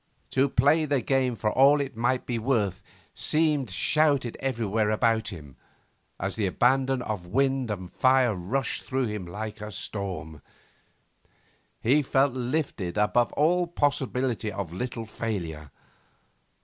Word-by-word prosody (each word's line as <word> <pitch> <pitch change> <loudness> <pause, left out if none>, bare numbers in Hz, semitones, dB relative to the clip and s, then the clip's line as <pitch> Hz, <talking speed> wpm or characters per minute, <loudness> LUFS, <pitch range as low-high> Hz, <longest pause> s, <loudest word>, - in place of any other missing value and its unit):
To 135 +1 +2
play 145 +6 +3
the 145 -2 +1
game 130 -1 +1
for 105 -1 -1
all 140 +4 +5
it 135 -4 -3
might 120 +3 0
be 120 -2 -2
worth 110 -6 0 0.3
seemed 150 -5 +1
shouted 140 - +2
everywhere 115 -5 0
about 110 0 +1
him, 75 - -8 0.6
as 95 +1 -2
the 105 -3 0
abandon 130 +5 +2
of 105 -7 -4
wind 135 +3 +1
and 95 -4 -5
fire 130 -3 +3
rushed 105 +8 -2
through 130 0 -1
him 105 -5 -4
like 105 +4 -6
a 105 0 -6
storm. 90 -7 -5 1.4
He 140 +6 +3
felt 135 -1 +2
lifted 125 - -2
above 110 +3 +2
all 175 +4 +2
possibility 130 -8 -1
of 95 -4 -5
little 115 +3 -4
failure. 85 -10 -5
120 Hz, 135 wpm, -27 LUFS, 105-135 Hz, 1.4 s, all